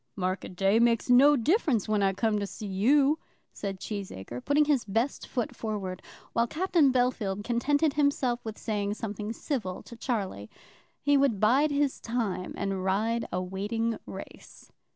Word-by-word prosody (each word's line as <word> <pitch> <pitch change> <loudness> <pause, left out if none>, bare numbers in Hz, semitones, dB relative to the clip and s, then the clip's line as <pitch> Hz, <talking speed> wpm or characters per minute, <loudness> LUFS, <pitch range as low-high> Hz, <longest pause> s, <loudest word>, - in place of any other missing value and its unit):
"Market 185 0 -3
day 195 +4 +3
makes 235 +1 +3
no 280 +4 +7
difference 280 - +1
when 215 -1 +1
I 195 -1 +3
come 210 +2 0
to 200 - -2
see 215 - -8
you," 270 +10 +3 0.3
said 195 -2 -5
Cheesacre, 125 - -6
putting 295 +2 +3
his 290 -5 +2
best 225 +7 -1
foot 240 -3 -3
forward, 200 -5 -4 0.3
while 235 +1 +2
Captain 325 -2 +2
Bellfield 240 -6 0
contented 285 +6 +1
himself 280 -4 +1
with 220 -1 -6
saying 205 -1 -2
something 210 -1 -4
civil 225 - -4
to 235 - -11
Charlie. 195 - -3 0.5
He 285 0 +4
would 270 -7 +2
bide 260 +9 +4
his 285 -1 0
time 225 -6 -2
and 195 -2 -2
ride 220 +5 0
a 180 0 -1
waiting 215 +5 -2
race. - - -11
225 Hz, 155 wpm, -28 LUFS, 195-265 Hz, 0.5 s, no